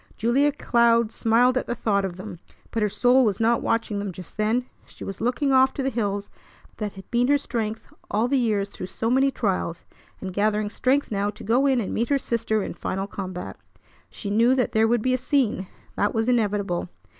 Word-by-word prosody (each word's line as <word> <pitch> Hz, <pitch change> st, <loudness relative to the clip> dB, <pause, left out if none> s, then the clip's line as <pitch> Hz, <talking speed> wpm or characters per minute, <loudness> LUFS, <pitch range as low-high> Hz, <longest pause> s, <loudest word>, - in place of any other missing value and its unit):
Julia 265 Hz, +6 st, +3 dB
Cloud 235 Hz, -4 st, +2 dB
smiled 245 Hz, +4 st, +3 dB
at -, -, -7 dB
the 240 Hz, -, -2 dB
thought 200 Hz, -3 st, +1 dB
of 190 Hz, -2 st, -3 dB
them, 190 Hz, -2 st, -8 dB, 0.3 s
but 225 Hz, -, -1 dB
her 210 Hz, -, +2 dB
soul 250 Hz, +5 st, +4 dB
was 205 Hz, -5 st, +1 dB
not 230 Hz, +1 st, +2 dB
watching 225 Hz, -2 st, -1 dB
them 200 Hz, -1 st, -3 dB
just 180 Hz, -1 st, -11 dB
then. 220 Hz, +4 st, +1 dB, 0.2 s
She -, -, -12 dB
was 195 Hz, +1 st, -6 dB
looking 255 Hz, +4 st, +1 dB
off 265 Hz, 0 st, +4 dB
to 275 Hz, -, -2 dB
the 270 Hz, -, 0 dB
hills 205 Hz, -3 st, -2 dB, 0.5 s
that 210 Hz, -2 st, -4 dB
had 190 Hz, -1 st, -13 dB
been 245 Hz, +1 st, +2 dB
her 285 Hz, +1 st, +4 dB
strength 225 Hz, -5 st, -4 dB, 0.2 s
all 220 Hz, +3 st, +1 dB
the 275 Hz, +1 st, +2 dB
years 210 Hz, -4 st, +1 dB
through 185 Hz, -, -7 dB
so 225 Hz, +4 st, -2 dB
many 265 Hz, +2 st, +4 dB
trials, 190 Hz, -9 st, -2 dB, 0.4 s
and 190 Hz, -1 st, -6 dB
gathering 210 Hz, +1 st, 0 dB
strength 265 Hz, +4 st, +1 dB
now 200 Hz, 0 st, 0 dB
to -, -, -9 dB
go 250 Hz, +6 st, +2 dB
in 265 Hz, -2 st, +3 dB
and 210 Hz, -, -3 dB
meet 235 Hz, -, -1 dB
her 285 Hz, -, +3 dB
sister 225 Hz, -4 st, -1 dB
in -, -, -5 dB
final 195 Hz, +1 st, -3 dB
combat. 185 Hz, -3 st, -6 dB, 0.5 s
She 200 Hz, -, -6 dB
knew 235 Hz, +5 st, +4 dB
that 250 Hz, -3 st, +1 dB
there 220 Hz, 0 st, +3 dB
would 235 Hz, -1 st, +1 dB
be 255 Hz, -, +2 dB
a 255 Hz, -, +1 dB
scene; 255 Hz, -7 st, 0 dB, 0.3 s
that 205 Hz, -, +1 dB
was 225 Hz, +1 st, +1 dB
inevitable. 205 Hz, -7 st, 0 dB
225 Hz, 215 wpm, -24 LUFS, 205-250 Hz, 0.5 s, soul